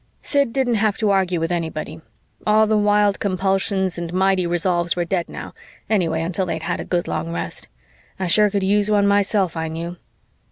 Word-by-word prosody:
Sid 280 -4 +2
didn't 260 -1 +1
have 215 -2 +1
to 215 -2 +1
argue 185 -3 +1
with 165 +1 -2
anybody; 160 -2 -4 0.5
all 215 +1 +5
the 215 0 +1
wild 205 -1 +3
compulsions 190 -1 0
and 170 -1 -5
mighty 190 0 +2
resolves 175 0 0
were 175 -1 -1
dead 175 0 -2
now, - - -8 0.4
anyway 165 -6 +1
until 185 +2 -1
they'd 160 -1 -3
had 175 +1 -2
a - - -3
good 175 -1 -1
long 85 0 -3
rest. 85 0 -5 0.5
I 190 - -1
sure 210 +4 +4
could 200 -1 -1
use 205 +2 +2
one 205 -1 +3
myself, 200 -3 +2
I 160 0 -2
knew. 170 +2 -5
185 Hz, 190 wpm, -21 LUFS, 170-205 Hz, 0.5 s, all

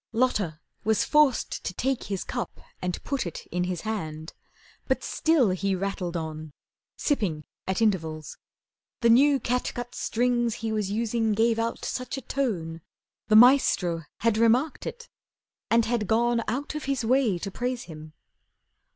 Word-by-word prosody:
Lotta 210 -10 +1 0.2
was 220 0 +2
forced 300 -4 +2
to 180 - -4
take 265 0 -1
his 195 -2 -3
cup - - -5 0.2
and 180 -1 -3
put 275 -9 -2
It 170 - -7
in 180 +1 0
his 180 -2 -3
hand. 160 -8 -4 0.5
But - - 0
still 305 - +2
he 195 +1 0
rattled 185 -2 -3
on, 155 -2 -6 0.4
Sipping 195 - 0 0.2
at 190 +4 +1
intervals. 160 -7 -1 0.6
The 235 -1 +5
new 275 +3 +5
catgut 245 0 -2
Strings 240 -1 0
he 225 -1 -3
was 210 -3 -1
using 225 +1 0
gave 225 +2 +2
out 230 0 -2
such 255 +1 -3
a - - -5
tone 180 -13 -2 0.5
The 215 - +4
"Maestro" 215 - +5 0.2
had 225 -1 +2
remarked 245 +6 +2
it, 475 0 -7 0.6
and 230 0 +4
had 230 -3 -1
gone 235 +1 +2
Out 280 +5 -2
of 305 -1 -5
his 270 -4 -1
way 245 -5 +3
to 195 +3 -5
praise 245 +3 -3
him. 155 -2 -11
220 Hz, 150 wpm, -26 LUFS, 180-245 Hz, 0.6 s, The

